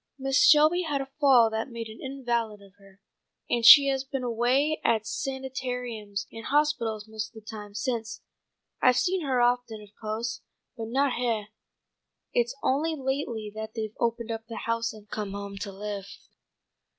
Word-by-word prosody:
"Mrs. 270 +10 +4
Shelby 310 +4 +6
had 300 -5 -1
a 270 0 -6
fall 255 -6 +6
that 220 +4 -2
made 235 -1 -6
an 220 +1 -11
invalid 240 -5 -2
of 200 -1 -18
her, 195 -1 -19 0.5
and 240 -1 0
she 280 +4 +11
has 270 -1 0
been 270 -1 -4
away 250 +6 +1
at 220 -2 +2
sanitariums 250 -6 -4
and 225 - -9
hospitals 245 -8 0
most 220 -1 -5
of - - -8
the 215 - -23
time 210 -2 -8
since. 230 -1 -3 0.6
I've 250 -1 +5
seen 375 +4 +1
her 265 -3 +1
often, 245 -2 +1
of 210 -1 -13
co'se, 225 +2 -3 0.3
but 225 -2 -5
not 270 +3 +1
heah. 225 -4 -1 0.8
It's 240 +2 +1
only 310 +5 +1
lately 265 -6 -3
that 220 +1 -7
they've 220 -1 -4
opened 235 0 -1
up 225 0 -5
the 230 - -7
house 230 0 0
and 215 -1 -14
come 205 -1 -4
home 200 0 -6
to 200 0 -5
live." 200 0 -6
235 Hz, 170 wpm, -27 LUFS, 215-265 Hz, 0.8 s, she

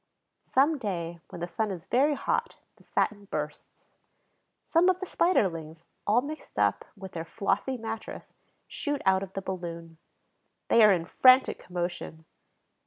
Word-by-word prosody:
Some 285 +3 +2
day, 170 -6 -4
when 170 - -9
the 175 - -2
sun 215 +4 -2
is 185 -3 -6
very 285 +4 +3
hot, 470 +10 -1 0.2
the - - -21
satin 205 -1 -1
bursts. 150 -5 -6 0.7
Some 345 +2 +4
of 365 -1 +2
the 380 - -4
Spiderlings, 165 - 0 0.2
all 220 +4 +4
mixed 310 +2 -8
up - - +2
with 190 -1 -9
their 165 - -4
flossy 205 +8 -1
mattress, 225 -1 -7 0.3
shoot 290 -2 -3
out 190 0 +4
of 195 -1 -7
the 195 - -4
balloon. 170 -3 -6 0.7
They 230 - +6
are 210 - +8
in 175 -3 +1
frantic 255 +7 +5
commotion. 175 -2 -5
195 Hz, 150 wpm, -28 LUFS, 170-260 Hz, 0.7 s, are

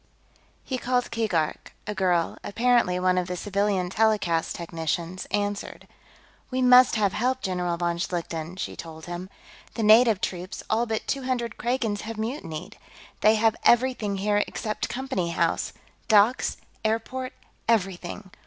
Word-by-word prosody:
He 260 -1 -3
called 245 0 0
Keegark; 190 -9 -1
a 210 - -3
girl, 180 -4 +1
apparently 230 -4 +2
one 185 0 +3
of 180 - -3
the 180 - -3
civilian 195 -1 0
telecast 205 -7 +1
technicians, 170 +1 -3
answered. 205 0 -3 0.6
"We 255 - -2
must 250 -1 +7
have 205 -3 +2
help, 260 +3 0
General 180 -2 -1
von 170 0 -1
Schlichten," 170 -1 -3
she - - -4
told 160 -1 -9
him. 175 +2 -6 0.5
"The 225 - -1
native 220 -1 +6
troops, 180 +1 -4
all 230 +2 +2
but 220 -1 -2
two 275 -2 -2
hundred 240 -4 -1
Kragans, 235 -4 -1
have 225 +1 -6
mutinied. 210 - -5 0.4
They 215 +1 +5
have 220 0 +3
everything 240 -5 +3
here 205 +1 +2
except 215 -1 -3
Company 255 -9 -2
House 170 - 0 0.4
docks, 220 +2 +4 0.3
airport, 230 +4 -2 0.3
everything. 195 -3 -1
205 Hz, 140 wpm, -26 LUFS, 180-230 Hz, 0.6 s, must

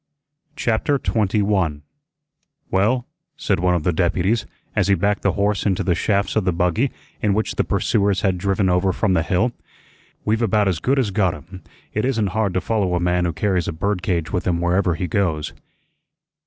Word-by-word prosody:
CHAPTER 140 0 +1
21 100 - 0 0.9
"Well," 115 +6 +2 0.3
said 105 - 0
one 90 0 +2
of 85 - -1
the 90 - +1
deputies, 95 +6 +1 0.3
as - - +2
he 100 - +4
backed 100 +1 0
the 100 - +1
horse 100 0 0
into 95 -3 0
the 90 - +2
shafts 100 +2 0
of 110 - +2
the 90 - +1
buggy 90 +9 +1 0.3
in 100 -2 +2
which 110 - -1
the - - +1
pursuers 100 -3 +1
had 95 -2 +1
driven 95 +1 +1
over 90 +1 +2
from 105 -4 +1
the 85 - +3
Hill, 90 +9 +1 0.7
"we've 110 +2 +1
about 105 -2 +2
as 90 -4 0
good 135 - +1
as 120 -6 +1
got 95 -4 +1
him. 90 +6 -12 0.3
It 105 - -1
isn't 115 -6 0
hard 110 -4 0
to 95 - +1
follow 100 -4 0
a - - +1
man 90 0 +1
who 85 - 0
carries 90 +1 0
a - - -1
bird 95 +4 -2
cage 85 -2 -2
with 90 - -1
him 85 -2 +1
wherever 90 0 +1
he 90 - -3
goes." 80 -4 -1
95 Hz, 195 wpm, -21 LUFS, 90-105 Hz, 0.9 s, he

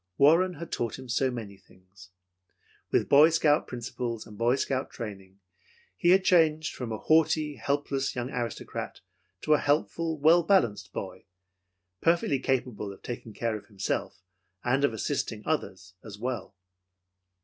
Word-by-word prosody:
Warren 170 +6 +5
had 165 +2 -8
taught 115 -3 -2
him 130 0 -10
so 130 +3 +1
many 110 -5 -7
things. 90 -1 -19 0.8
With - - +1
Boy 150 +3 +7
Scout 155 -2 +2
principles 120 -2 -5
and 105 - -12
Boy 120 +4 +2
Scout 135 -1 -2
training, 95 -4 -8 0.6
he 175 - +1
had 190 +1 +6
changed 160 -3 +3
from 120 -3 -5
a 110 - -2
haughty, 155 0 +2
helpless 140 +1 -1
young 125 +1 -3
aristocrat 120 -2 -5 0.4
to 155 - +3
a 150 - +4
helpful, 160 +2 0
well 160 +4 +5
balanced 115 - +1
boy, 95 -1 -7 0.8
perfectly 165 -5 +2
capable 125 -7 -2
of 100 - -14
taking 120 -3 -7
care 115 -2 -1
of 105 - -9
himself 95 -2 -3 0.4
and 135 +3 +1
of 140 - +3
assisting 110 - -3
others 90 - -3
as 105 -2 -9
well. 120 -2 -4
130 Hz, 150 wpm, -28 LUFS, 110-155 Hz, 0.8 s, Boy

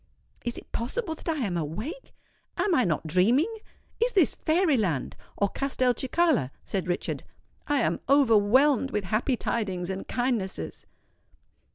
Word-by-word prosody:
"Is 240 - -2
it - - -11
possible 320 - -2
that 320 - -7
I 325 - +1
am 185 -4 -2
awake? 180 - -5 0.4
am 410 - +1
I 255 -7 +3
not 165 -2 -1
dreaming? 230 - +3 0.5
is - - 0
this 365 -7 +4
fairy 320 -1 +2
land, 175 - -1 0.2
or 200 - +2
Castelcicala?" 260 - +1 0.2
said 190 -3 -2
Richard. 175 - -2 0.5
"I 290 -2 +2
am - - 0
overwhelmed 265 +1 +4
with 210 -6 -2
happy 220 +7 0
tidings 190 -7 -2
and 190 - -5
kindnesses." 245 -6 -2
245 Hz, 140 wpm, -27 LUFS, 190-295 Hz, 0.5 s, this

